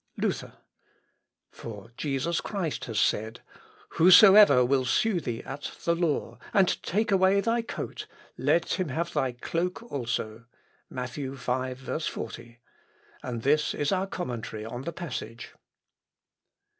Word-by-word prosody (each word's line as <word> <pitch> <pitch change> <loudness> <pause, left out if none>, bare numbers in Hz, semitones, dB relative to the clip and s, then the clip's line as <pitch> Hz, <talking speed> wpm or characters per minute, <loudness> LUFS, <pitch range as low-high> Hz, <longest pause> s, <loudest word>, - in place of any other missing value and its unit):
Luther. - - -2 1.0
"For 115 0 -9
Jesus 145 +4 -1
Christ 165 -10 -3
has 110 -3 -2
said, 110 +2 0 0.5
'Whosoever 185 - +8
will 135 +1 +2
sue 180 - +1
thee 120 -4 -4
at 140 +2 -6
the 170 - +3
law 150 -9 -1 0.2
and 195 -3 +3
take 215 +4 0
away 190 +1 +4
thy 230 +3 +1
coat, 230 - -6 0.3
let 170 +2 +1
him 180 -4 -1
have 170 +5 -2
thy 130 -2 0
cloak 170 - -3
also.' 115 -3 -3 0.4
(Matt. 125 -1 -5
v, 135 -1 -5
40.) 125 -2 -4 0.6
and 120 -3 -5
this 150 +2 +2
is 145 - 0
our 190 0 0
commentary 120 - -5
upon 120 +4 -6
the 170 - -2
passage." 125 -10 -7
140 Hz, 125 wpm, -27 LUFS, 120-180 Hz, 1.0 s, Whosoever